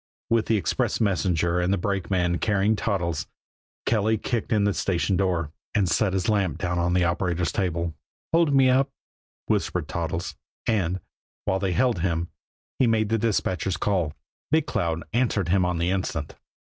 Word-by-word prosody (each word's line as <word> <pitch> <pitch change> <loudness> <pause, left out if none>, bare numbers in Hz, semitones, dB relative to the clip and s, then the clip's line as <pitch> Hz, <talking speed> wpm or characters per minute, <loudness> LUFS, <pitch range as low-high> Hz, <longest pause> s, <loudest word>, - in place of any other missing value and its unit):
With 115 -1 +3
the 110 - +3
express 95 - 0
messenger 90 -4 +1
and 90 +1 +1
a 100 - +2
brakeman 90 -2 0
carrying 105 +1 +2
Toddles, 85 -7 -1 0.6
Kelly 110 0 +2
kicked 115 +1 -2
in 105 -2 +3
the 100 0 +2
station 95 +1 0
door, 90 -5 0 0.2
and 100 -4 +3
set 95 +3 +2
his 95 -2 0
lamp 100 -8 +1
down 90 -2 -1
on 85 +1 +1
the 90 - +3
operator's 85 0 0
table. 85 -3 -1 0.4
"Hold 165 -2 +4
me 135 -1 +5
up," 130 +2 +3 0.6
whispered - - 0
Toddles 85 +1 -3 0.3
and, 95 -5 0 0.4
while 95 - +1
they 95 -2 0
held 120 -2 +2
him, 85 -1 -1 0.5
he 130 - +4
made 110 -2 +2
the 115 0 +1
dispatcher's 95 -4 0
call. 90 -7 0 0.4
Big 155 0 +3
Cloud 85 - -1
answered 110 -7 +1
him 95 0 +3
on 90 -1 0
the 85 +2 +1
instant. 90 -5 -2
95 Hz, 165 wpm, -25 LUFS, 85-110 Hz, 0.6 s, me